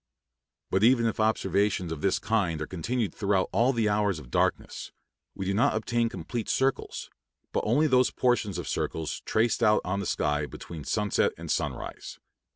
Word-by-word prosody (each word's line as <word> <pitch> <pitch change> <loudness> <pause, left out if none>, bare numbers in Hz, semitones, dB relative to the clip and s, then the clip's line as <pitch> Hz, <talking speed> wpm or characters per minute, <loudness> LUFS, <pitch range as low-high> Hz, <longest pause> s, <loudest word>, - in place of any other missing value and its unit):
But 95 +2 +2
even 120 0 +5
if 115 - -1
observations 100 -4 +1
of 80 -2 -5
this 95 - +2
kind 100 -8 0
are 75 - -2
continued 100 +4 -2
throughout 100 -2 +1
all 115 +7 +3
the 115 -4 +1
hours 105 -3 +1
of 65 -5 -11
darkness, - - -1 0.4
we 95 - -4
do 100 - 0
not 110 +2 +3
obtain 115 +1 0
complete 115 -1 -5
circles, 135 0 -1 0.4
but - - 0
only 140 +8 +3
those 130 -3 +4
portions 115 -7 0
of - - -5
circles 80 -1 -3
traced 115 +2 +1
out 105 -2 +4
on 100 +2 -1
the 100 - -3
sky 75 0 0
between 80 -1 -9
sunset 105 -2 +1
and - - -5
sunrise. - - -3
105 Hz, 170 wpm, -28 LUFS, 95-115 Hz, 0.4 s, even